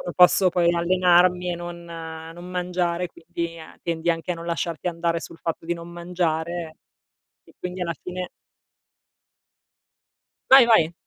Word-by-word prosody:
posso 180 +1 +6
poi 175 -1 +2
allenarmi 180 +1 +3
e - - -2
non 175 0 -7
non 165 0 -8
mangiare, 180 -1 -1
quindi, 170 0 -6 0.2
tendi 170 0 -1
anche 165 +1 0
a - - -2
non 165 0 -8
lasciarti 170 0 -2
andare, 170 -1 -1
sul 165 - -10
fatto 165 0 -4
di 170 - 0
non 170 0 -9
mangiare 170 -1 -2 0.7
e - - -21
quindi 180 +1 -5
alla 170 -1 -1
fine 180 0 -5 2.2
Vai, 265 -2 +10
vai. 175 -8 +4
170 Hz, 135 wpm, -24 LUFS, 165-180 Hz, 2.2 s, Vai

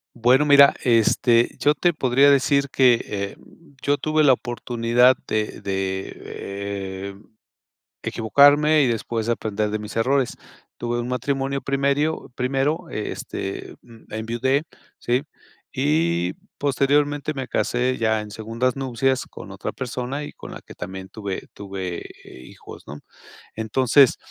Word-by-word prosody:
Bueno, 125 +5 +4
mira, 140 -1 +7
este, 115 0 +3
yo 145 +1 +3
te 175 +2 +1
podría 135 0 +4
decir 140 0 +3
que, 125 -3 +4
eh, 100 -1 -4 0.4
yo 145 0 +1
tuve 155 +1 +1
la 135 - +7
oportunidad 120 +1 +2
de 110 0 -2
de, 95 -1 -3
eh, 100 -1 -6 0.9
equivocarme 145 +7 +4
y 135 - +3
después 115 -1 -2
aprender 105 -2 -1
de 110 0 -2
mis 105 +1 -8
errores. 130 +3 +1 0.4
Tuve 120 0 -2
un 120 - -4
matrimonio 135 +2 -1
primerio 140 +2 0
primero, 135 +5 -1
este, 100 -2 -5
mm, 115 -3 -17
enviudé, 120 +6 0 0.4
¿sí? 125 +4 0 0.5
Y 85 - +1 0.2
posteriormente 145 +2 +1
me 130 -2 -5
casé 125 +1 0
ya 110 -1 +1
en 105 -1 -8
segundas 115 +5 -2
nupcias 130 0 0
con - - -11
otra - - -5
persona 130 +2 -4
y 145 - -7
con - - -11
la - - -8
que - - -13
también 95 0 -7
tuve 100 -3 -6
tuve, 95 -3 -5 0.2
eh, - - -13
hijos, - - -13
¿no? 75 +1 -9 0.6
Entonces, 125 +4 +3
120 Hz, 135 wpm, -23 LUFS, 105-140 Hz, 0.9 s, mira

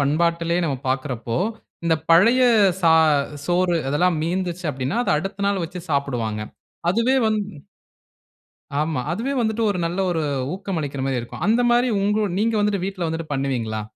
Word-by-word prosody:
பண்பாட்டிலயே 170 +4 +1
நம்ம 145 -4 -1
பார்க்கிறப்போ, 130 -3 -2 0.5
இந்த 165 - +3 0.2
பழைய 230 +10 +6 0.4
சா 165 -1 +6 0.5
சோறு, 175 0 +2
அதெல்லாம் 165 +4 +2
மீந்துச்சு 180 +1 -2
அப்படின்னா, 135 - -3
அதை - - +1
அடுத்த 195 +3 -4
நாள் 200 -3 0
வச்சு 180 +2 -7
சாப்பிடுவாங்க. 120 -7 -1 0.5
அதுவே 230 +7 +2
வந் 215 -1 +1 1.4
ஆமா. 155 -4 -1
அதுவே 235 +9 -2
வந்துட்டு 225 0 0
ஒரு 185 - -2
நல்ல 175 +3 -3
ஒரு 165 -2 -1 0.3
ஊக்கம் 195 -3 -4
அளிக்கிற 140 -2 -4
மாரி 130 -2 0
இருக்கும். 120 +7 -9
அந்த 230 +4 +3
மாரி 245 +1 +3
உங்களோ 210 +1 +1
நீங்க 225 +2 +1
வந்துட்டு 205 -3 0
வீட்ல 190 -3 -3
வந்துட்டு 160 -1 -5
பண்ணுவீங்களா? 125 -6 -2
170 Hz, 150 wpm, -22 LUFS, 140-200 Hz, 1.4 s, பழைய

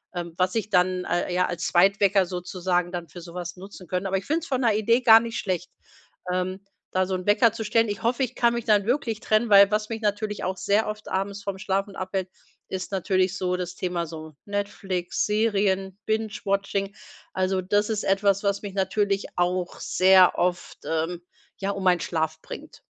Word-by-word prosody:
ähm, 170 -1 -5
was 185 +3 +1
ich 215 -1 -1
dann 180 0 +2
al 175 +1 0
äh, 175 - -3
ja, 180 - +3
als 175 -1 -3
Zweitwecker 195 +2 +4
sozusagen 180 0 -2
dann 175 -2 -5
für 175 - -10
sowas 175 +1 -7
nutzen 190 -1 -11
könnte. 185 +1 -2
Aber 195 0 0
ich 190 - -6
finde 315 +3 +1
es 335 - -9
von 260 -2 -1
der 225 -3 +3
Idee 230 +3 +3
gar 225 -2 +8
nicht 230 0 -5
schlecht, 180 -2 -2 0.6
ähm, 185 +1 -2 0.3
da 185 0 +1
so 190 - -4
'n 185 0 -4
Wecker 210 +2 +4
zu 225 - -4
stellen. 225 +1 +2
Ich 205 -1 -4
hoffe, 245 +3 +1
ich 250 0 -2
kann 235 -1 +2
mich 235 - -3
dann 210 -1 +3
wirklich 235 -4 0
trennen, 215 +1 +1
weil 200 0 +8
was 210 0 -1
mich 225 -1 -4
natürlich 210 0 -2
auch 185 +1 -2
sehr 210 +2 +1
oft 215 0 -6
abends 200 +1 -3
vom 195 -1 -4
Schlafen 195 +1 -2
abhält, 185 0 -3 0.4
ist 185 0 -5
natürlich 185 -1 +1
so 180 -1 -1
das 180 0 -5
Thema 175 -2 -2
so 155 -1 -9
Netflix, 200 -3 -2
Serien, 200 -3 0
Binge-Watching. 200 -2 -1 0.4
Also, 185 0 0
das 205 +3 +1
ist 215 -1 -1
etwas, 195 0 +2
was 200 0 0
mich 200 -2 -6
natürlich 200 +1 0
auch 180 0 -1
sehr 185 0 +5
oft, 175 0 -1
ähm, 165 +2 -2 0.4
ja, 195 0 -2
um 195 -1 -5
meinen 180 -2 +4
Schlaf 160 -1 -2
bringt. - - -10
195 Hz, 200 wpm, -25 LUFS, 180-210 Hz, 0.6 s, gar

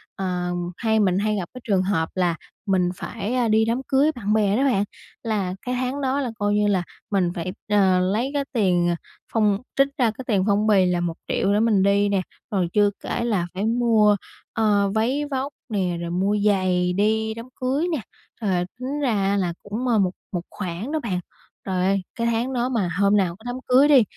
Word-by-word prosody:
ờ, 180 -2 -2 0.3
hay 220 -1 +1
mình 190 -3 +2
hay 215 +1 0
gặp 185 -4 -3
cái 255 - -9
trường 195 -4 +2
hợp 185 -4 0
là 175 -3 +1 0.3
mình 185 -3 +2
phải, 220 +4 -4
à, 250 -2 +2
đi 220 0 +3
đám 235 +3 0
cưới 275 +4 +3
bạn 210 -3 -1
bè 210 -1 +2
đó 265 - +2
bạn, 245 -8 +2 0.4
là 205 -5 -1
cái 250 0 -3
tháng 255 +3 -2
đó 270 +1 0
là 250 -4 -2
coi 205 0 +1
như 210 0 +2
là 190 -3 +2 0.3
mình 185 -4 +2
phải, 175 +1 -3 0.2
ờ, 190 -3 +4
lấy 210 +9 0
cái 285 -1 0
tiền, 180 -7 +2
ờ, 170 - +1 0.4
phong 210 -3 +3 0.2
trích 275 0 +4
ra 240 -4 +3
cái 250 +4 -9
tiền 200 -5 +2
phong 205 +1 +2
bì 200 -3 +5
là 180 -1 +1
1 175 -1 -1
triệu 200 - +1
để 205 - +3
mình 215 -4 +3
đi 200 +1 +3
nè, 200 -2 +1 0.3
rồi 190 -4 +1
chưa 205 -1 +4
kể - - -2
là 205 -7 0
phải 195 +3 -2
mua, 225 -2 +4 0.4
ờ, 205 -3 +2
váy 255 +7 +1
vóc 270 +2 -2 0.2
nè, 185 -5 -1
rồi 170 - -4
mua 190 +4 +1
giày 185 -3 +2
đi 220 +3 +1
đám 230 +1 -8 0.2
cưới 270 +6 +1
nè. 310 -7 -1 0.4
Trời, 185 -4 +1
tính 270 +4 -3
ra 200 -7 +1
là 175 -3 -1
cũng, 220 +5 -3
ờ, 230 -3 +3
một 185 -2 +2 0.2
một 175 - -2
khoản 190 +6 -5
đó 315 - 0
bạn, 205 -10 -2 0.5
trời 185 -1 0
ơi, 195 0 +2
cái 235 0 -1
tháng 235 +3 0
đó 245 0 0
mà 220 -8 0
hôm 200 +1 +4
nào 180 -4 +1
có 220 - -20
đám 245 0 -3
cưới 260 +3 +6
đi 275 -5 +7
210 Hz, 220 wpm, -23 LUFS, 190-235 Hz, 0.5 s, đi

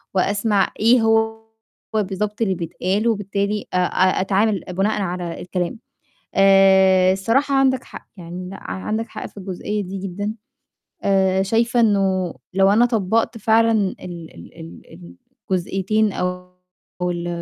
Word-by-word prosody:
وأسمع 205 +1 +1
إيه 230 +2 +5
هو 225 0 +1 0.5
بالضبط 210 +1 -2
اللي 195 -4 +1
بيتقال، 185 +5 -2
وبالتالي 205 -1 -1
أ - - +1
أ 185 +1 +2
أتعامل 200 +1 +1
بناءً 200 +3 0
على 175 -2 -4
الكلام. 180 +4 -3 0.6
آآ، 190 -1 +5
الصراحة 260 +9 +1
عندك 265 -1 +2
حق، - - -12
يعني 180 +1 -8
لأ، 195 - -8
عندك 220 +4 -3
حق - - -7
في - - -12
الجزئية 200 +2 -4
دي 190 +2 -6
جدًا. 195 +3 -4 0.7
آآ، 190 -1 +2
شايفة 230 +4 +1
إنه 195 -5 +1 0.2
لو 195 0 +4
أنا 230 +4 +5
طبّقت 225 +1 0
فعلًا 225 +1 +3
ال 200 -4 -1 0.3
ال 85 - -13
ال 80 +1 -12 0.5
الجزئيتين 195 +3 0
أو 180 0 -4 0.5
ال 175 -1 -2
195 Hz, 130 wpm, -21 LUFS, 185-220 Hz, 0.7 s, إيه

